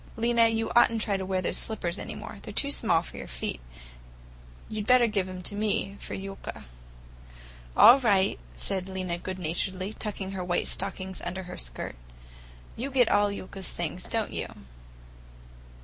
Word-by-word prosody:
"Lena, 230 0 +4
you 225 0 0
ought 240 - +7
n't 230 - -1
to - - 0
try 200 - +1
to 190 -1 -3
wear 185 -1 0
those - - +1
slippers 180 -6 -2
any - - -6
more. - - -8
They're - - -7
too 280 - +2
small 170 -11 +2
for - - -10
your - - -6
feet. - - -4 1.1
You'd 215 -1 -4
better 250 -1 +7
give 205 -4 0
them 185 -1 -7
to 205 - -1
me 205 -1 0
for - - -6
Yulka." 195 0 -7 1.1
"All 250 +4 +10
right," 200 -6 +3 0.2
said 190 -1 0
Lena 185 -2 -3
good 185 +1 -5
naturedly, 185 +3 -2
tucking 200 -3 -4
her 190 -2 -3
white 175 0 0
stockings 190 -1 -1
under 185 +2 -4
her 180 0 -8
skirt. - - -5 0.8
"You 255 +5 -3
get 255 -4 +4
all 205 0 +4
Yulka's 195 -1 -5
things, 175 +1 -4
don't 225 -2 -1
you? - - -2
195 Hz, 175 wpm, -28 LUFS, 185-220 Hz, 1.1 s, All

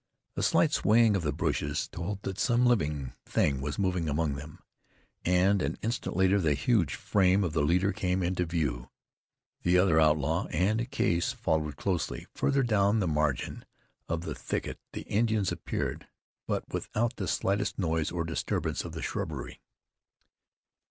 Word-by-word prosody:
A - - -2
slight - - +3
swaying 110 -1 +4
of 95 - 0
the 75 -3 0
bushes - - -1
told 95 +4 -5
that 95 0 -4
some 120 0 +3
living 75 - +1
thing 70 -3 +1
was 75 +1 -3
moving 90 -4 0
among 75 0 0
them, 75 +2 -8 0.7
and 90 +2 +3
an - - -2
instant 115 -3 -2
later 95 +2 +3
the 75 -4 +2
huge 85 - +1
frame 95 0 +2
of 85 -4 -2
the 80 - +1
leader 90 +7 +2
came 90 0 0
into 90 0 0
view. 70 -8 -2 0.7
The 90 +1 +3
other 90 -3 +4
outlaw, 80 +3 +2
and 110 +9 0
Case, 85 +5 +1
followed 80 - -1
closely. 90 -5 -2
Farther 140 -1 +1
down 105 -2 +3
the 95 - 0
margin 75 -4 -1 0.5
of 85 0 -1
the - - -4
thicket - - -4
the - - -5
Indians 110 -2 +1
appeared; - - -3 0.4
but - - -2
without 120 +3 -1
the 95 - -3
slightest 100 +1 0
noise 80 -4 0
or 85 -1 -1
disturbance 80 -1 -2
of - - -7
the - - -5
shrubbery. - - -4
90 Hz, 160 wpm, -29 LUFS, 80-100 Hz, 0.7 s, swaying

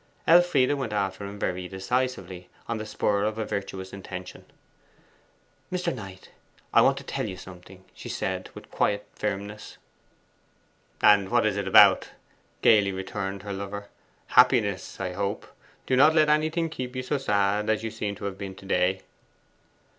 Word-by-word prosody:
Elfride 165 -6 +5
went 130 -6 -3
after 100 -1 -2
him 100 +1 -8
very 90 -2 -3
decisively, 95 -2 -3 0.2
on 115 -1 -2
the 110 - -6
spur 100 -1 0
of 110 +1 -1
a 110 - -2
virtuous 95 -2 -5
intention. 95 -2 -8 1.3
'Mr. 180 -1 -1
Knight, 95 -6 -10 0.4
I - - +7
want - - +4
to - - -7
tell - - -3
you 95 - -7
something,' 95 +1 -13
she - - -9
said, - - -3
with - - -12
quiet 100 0 0
firmness. 105 +1 -5 1.3
'And 100 -2 +6
what 120 -2 +3
is 105 -2 +1
it 100 -1 -3
about?' 95 - +6 0.5
gaily 105 -3 +5
returned 95 0 -5
her 100 -1 -5
lover. 100 +1 -6 0.4
'Happiness, - - +3
I 90 -2 -3
hope. 100 +2 -3 0.4
Do 130 - +1
not 150 +5 +6
let 155 -1 +4
anything 155 +2 +1
keep 130 -3 -6
you 130 - -3
so 140 +2 -1
sad 105 -3 +1
as 110 0 +1
you 110 - -3
seem 105 -2 -4
to 100 - -8
have 100 -1 -5
been 95 -2 -6
to 95 - -14
day. 95 0 +1
100 Hz, 160 wpm, -26 LUFS, 95-115 Hz, 1.3 s, I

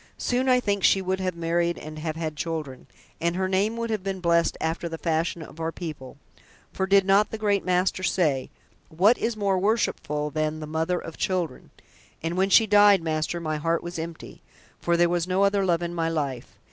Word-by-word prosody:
"Soon 255 +1 0
I 250 0 +5
think 200 -5 -1
she 195 - +5
would 190 0 -2
have 185 -2 -2
married 170 +1 0
and 155 0 -8
have 155 0 -3
had 160 -2 -4
children, 155 -4 -5 0.3
and 170 +1 0
her 190 0 0
name 200 +4 0
would 230 0 -3
have 215 -3 -1
been 195 -1 -3
blessed 170 -1 +2
after 165 +1 -2
the 165 - -5
fashion 165 0 -1
of 155 - -13
our 165 0 -2
people; 150 -7 -8 0.6
for 190 - -1
did 195 0 +4
not 195 +2 +4
the 220 - -5
Great 205 -2 +1
Master 185 +1 +1
say: 155 -8 0 0.4
'What 195 +9 +4
is 230 -1 -1
more 195 -2 +1
worshipful 150 -8 0
than 155 0 -1
the 155 - -5
mother 160 +3 -1
of 165 - -8
children?' 175 -8 -2 0.5
And 165 +1 -2
when 190 +1 +2
she 225 +3 +6
died, 205 -3 +5
master, 155 +1 -1
my 155 -2 -2
heart 165 +2 0
was 175 -1 -6
empty, 165 0 -8 0.4
for 170 0 +1
there 175 0 +4
was 175 0 -1
no 185 +2 +2
other 200 0 +2
love 175 -2 +1
in 170 0 -3
my 165 -1 -1
life. 140 -6 -4
170 Hz, 210 wpm, -25 LUFS, 160-195 Hz, 0.6 s, she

